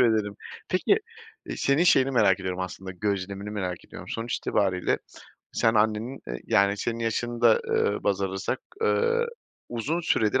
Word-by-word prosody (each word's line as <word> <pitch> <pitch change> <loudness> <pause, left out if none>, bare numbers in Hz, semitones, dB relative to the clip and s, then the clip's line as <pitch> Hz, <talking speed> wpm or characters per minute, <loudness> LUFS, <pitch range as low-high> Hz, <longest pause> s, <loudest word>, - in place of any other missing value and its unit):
ederim. 110 -4 +2 0.3
Peki, 390 - +3 0.5
eee, - - -4
senin 140 +5 +3
şeyini 135 -6 +5
merak 105 -7 +4
ediyorum 95 -1 -3
aslında, 95 +1 -5
gözlemini 100 +1 -3
merak 95 -4 -4
ediyorum. - - -10
Sonuç 115 +1 -2
itibariyle 95 -3 +1 0.5
sen 115 0 +2
annenin, 110 +4 +1
eee, - - -4
yani 100 0 +3
senin 115 +3 -2
yaşını 115 +1 -2
da 115 -2 +6 0.4
baz 100 -1 +1
alırsak, 95 +6 -2 0.2
eee, 470 +1 +2 0.4
uzun 130 +9 -1
süredir 130 -7 +2
110 Hz, 145 wpm, -26 LUFS, 95-120 Hz, 0.5 s, da